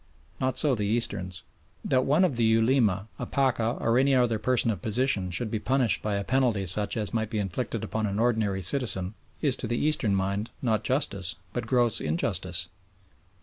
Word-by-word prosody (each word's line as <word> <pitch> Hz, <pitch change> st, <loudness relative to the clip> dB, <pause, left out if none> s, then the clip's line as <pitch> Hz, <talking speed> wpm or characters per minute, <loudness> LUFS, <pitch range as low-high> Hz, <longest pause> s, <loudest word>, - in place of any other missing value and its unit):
Not 130 Hz, -1 st, -1 dB
so 145 Hz, -3 st, +3 dB
the 105 Hz, -4 st, -1 dB
Easterns. 95 Hz, -5 st, -1 dB, 0.4 s
That 130 Hz, -1 st, +2 dB
one 155 Hz, +7 st, +3 dB
of 155 Hz, -8 st, -1 dB
the 120 Hz, -, +1 dB
Ulema, 110 Hz, -3 st, +2 dB
a -, -, -4 dB
Pacha 125 Hz, -4 st, 0 dB
or 115 Hz, +2 st, +2 dB
any 135 Hz, 0 st, +3 dB
other 120 Hz, -3 st, +2 dB
person 120 Hz, 0 st, +1 dB
of 100 Hz, -6 st, -5 dB
position 110 Hz, -3 st, 0 dB
should 105 Hz, +5 st, -2 dB
be 110 Hz, -, -1 dB
punished 125 Hz, -4 st, +1 dB
by 105 Hz, -1 st, -2 dB
a 100 Hz, -, -2 dB
penalty 120 Hz, -5 st, +1 dB
such 100 Hz, +5 st, +2 dB
as 105 Hz, 0 st, -1 dB
might 110 Hz, -2 st, -1 dB
be 110 Hz, -, -3 dB
inflicted 95 Hz, -3 st, -3 dB
upon 110 Hz, -1 st, -2 dB
any 100 Hz, 0 st, -3 dB
ordinary 110 Hz, -5 st, 0 dB
citizen 95 Hz, -4 st, +2 dB, 0.3 s
is 140 Hz, -4 st, +3 dB
to 120 Hz, -, -3 dB
the 120 Hz, +2 st, -1 dB
Eastern 145 Hz, -10 st, +1 dB
mind 100 Hz, +3 st, -2 dB
not 110 Hz, -4 st, 0 dB
justice 100 Hz, -, 0 dB, 0.2 s
but 120 Hz, -, -4 dB
gross 120 Hz, -3 st, +2 dB
injustice. 85 Hz, +1 st, 0 dB
110 Hz, 190 wpm, -27 LUFS, 100-125 Hz, 0.4 s, so